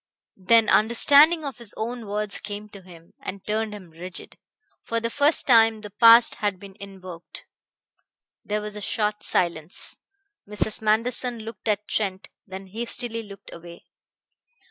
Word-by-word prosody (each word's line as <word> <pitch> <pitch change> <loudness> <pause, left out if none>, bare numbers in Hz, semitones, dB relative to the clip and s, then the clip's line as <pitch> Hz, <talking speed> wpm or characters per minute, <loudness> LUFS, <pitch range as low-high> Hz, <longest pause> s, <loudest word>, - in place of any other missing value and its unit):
Then 225 +3 +4
understanding 290 +8 +5
of 270 -4 -6
his 235 -3 -7
own 230 0 -5
words 210 0 -3
came 210 0 -7
to 200 -1 -12
him, 170 -2 -17
and 195 0 -8
turned 215 +1 -2
him 195 -5 -11
rigid. 175 +3 -8 0.4
For 230 - -2
the 230 0 -3
first 290 +4 +2
time 225 -3 +4
the 210 -1 -9
past 230 +3 +7
had 205 -3 -1
been 195 -1 -13
invoked. 185 -3 -11 1.0
There 210 0 -2
was 210 0 -6
a 210 - -6
short 210 -1 -2
silence. 170 -3 -1 0.5
Mrs. 210 +1 -1
Manderson 230 +2 0
looked 225 +1 -10
at 210 -1 -1
Trent, 195 -3 -3 0.2
then 190 0 -8
hastily 230 +3 -2
looked 200 -3 -13
away. 170 0 -12
210 Hz, 145 wpm, -24 LUFS, 195-230 Hz, 1.0 s, past